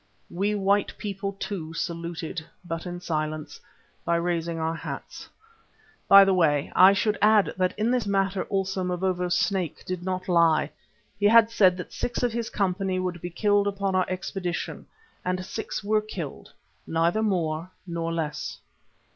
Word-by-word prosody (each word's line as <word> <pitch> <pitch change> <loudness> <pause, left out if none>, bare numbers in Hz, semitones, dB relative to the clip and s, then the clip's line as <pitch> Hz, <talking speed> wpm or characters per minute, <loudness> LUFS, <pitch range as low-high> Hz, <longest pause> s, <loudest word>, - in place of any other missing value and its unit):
We 200 +4 0
white 200 0 +1
people 200 -1 -4
too 175 -5 -5
saluted, 170 0 -4 0.2
but 165 +1 -4
in 175 0 -5
silence, 155 -2 -3 0.4
by 170 - +1
raising 170 -1 -1
our 160 0 -1
hats. 165 - -7 0.8
By 195 0 +9
the 195 - +3
way, 150 -5 +2
I 185 +2 +8
should 205 +1 0
add 210 -1 +4
that 185 -1 0
in 220 +3 +1
this 250 -4 0
matter 195 -1 0
also 190 -1 -1
Mavovo's 180 0 0
"Snake" 180 -2 -1
did 185 -1 -4
not 185 0 -3
lie. 170 -3 +3 0.5
He 205 - +4
had 230 +1 +6
said 185 -5 +4
that 180 - -8
six 245 +1 -3
of 240 -2 +1
his 235 -1 -2
company 190 -1 -1
would 180 -2 -3
be 175 - -4
killed 205 +3 +2
upon 200 -1 -1
our 185 -1 +1
expedition, 185 -1 -4 0.4
and 185 0 -2
six 220 - -5
were 215 +1 +2
killed, 180 -9 -7 0.4
neither 170 +6 +1
more 170 -5 -1 0.2
nor 170 -2 -3
less. 155 -3 -3
185 Hz, 155 wpm, -26 LUFS, 170-200 Hz, 0.8 s, By